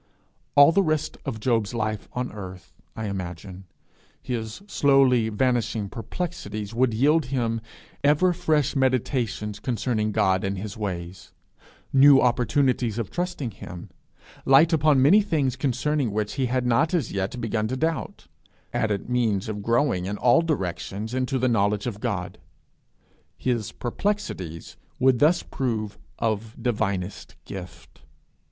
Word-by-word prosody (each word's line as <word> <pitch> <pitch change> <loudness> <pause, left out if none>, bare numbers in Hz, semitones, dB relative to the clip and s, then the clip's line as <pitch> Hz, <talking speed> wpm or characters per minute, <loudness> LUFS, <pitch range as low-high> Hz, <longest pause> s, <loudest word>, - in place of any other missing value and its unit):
All 145 +2 +8
the 195 - +3
rest 155 -4 -1
of 125 -6 -4
Job's 115 -1 0
life 110 -2 -2
on 125 0 -3
earth, 95 -3 -9 0.2
I 110 - -4
imagine, 95 -1 -6 0.5
his 115 - -5
slowly 135 - +3
vanishing 115 -2 0
perplexities 115 - -5
would 125 +1 +2
yield 145 +7 +3
him 120 -3 -1 0.4
ever 150 +6 +4
fresh 155 -6 +1
meditations 125 -5 0
concerning 110 -3 -1
God 95 -3 +2
and 95 0 -2
his 100 +1 -6
ways, 90 -4 -6 0.6
new 135 0 +8
opportunities 125 -2 +1
of 115 -5 -3
trusting 175 -8 -3
him, 90 -3 -10 0.5
light 150 +5 +5
upon 150 -4 +4
many 190 +10 +6
things 150 - 0
concerning 140 0 0
which 105 0 -2
he 135 -2 0
had 125 +1 0
not 145 +9 +2
as 165 - -1
yet 100 +5 -3
begun 110 -2 -1
to 130 +3 -3
doubt, 160 +4 -2 0.5
added 105 -3 -1
means 115 -6 0
of 105 -1 -4
growing 115 -4 +1
in 105 +1 -3
all 125 +7 +4
directions 105 - -3
into 130 +1 0
the 130 0 +1
knowledge 105 -3 +1
of 110 -5 -4
God. 100 -8 -3 1.0
His 120 -5 -1
perplexities 120 - -4 0.2
would 130 -2 +3
thus 165 +4 +4
prove 110 -5 -3 0.2
of 110 0 -2
divinest 105 -5 -2
gift. 85 -4 -10
120 Hz, 135 wpm, -25 LUFS, 105-135 Hz, 1.0 s, All